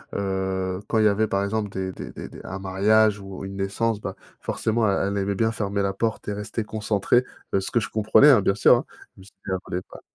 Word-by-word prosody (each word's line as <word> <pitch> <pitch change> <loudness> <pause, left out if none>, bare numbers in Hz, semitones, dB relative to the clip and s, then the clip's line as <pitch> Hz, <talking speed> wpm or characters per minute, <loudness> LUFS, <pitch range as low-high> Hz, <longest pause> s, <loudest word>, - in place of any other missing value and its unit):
heu, 95 -1 -2
quand 115 - 0
il 110 - +4
y - - +7
avait, 105 +2 +2
par 100 -1 0
exemple, 105 +1 -1
des 95 -1 -4
des - - -8
des - - -8
des - - -11
un 95 - -6
mariage 105 +3 +3
ou 95 0 -8
une 95 0 -7
naissance, 105 +3 -1
bah, 95 - -5 0.2
forcément 110 -1 0
elle, 100 0 +1
elle 100 - -2
aimait 100 +1 -1
bien 110 +3 +1
fermer 100 -2 -2
la 100 0 0
porte 110 +3 -2
et 105 - -1
rester 105 +2 -4
concentrée, 110 +2 +1 0.3
heu, 95 - +3
ce - - -4
que 120 - +2
je - - -4
comprenais, 110 +7 +6
hein, 115 -7 +6
bien 95 +1 +2
sûr, 105 - +6
hein, - - -4 0.3
même 95 - -14
si 100 - -16
elle 95 - -2
voulait 90 - -3
pas. - - -11
100 Hz, 250 wpm, -24 LUFS, 95-110 Hz, 0.3 s, y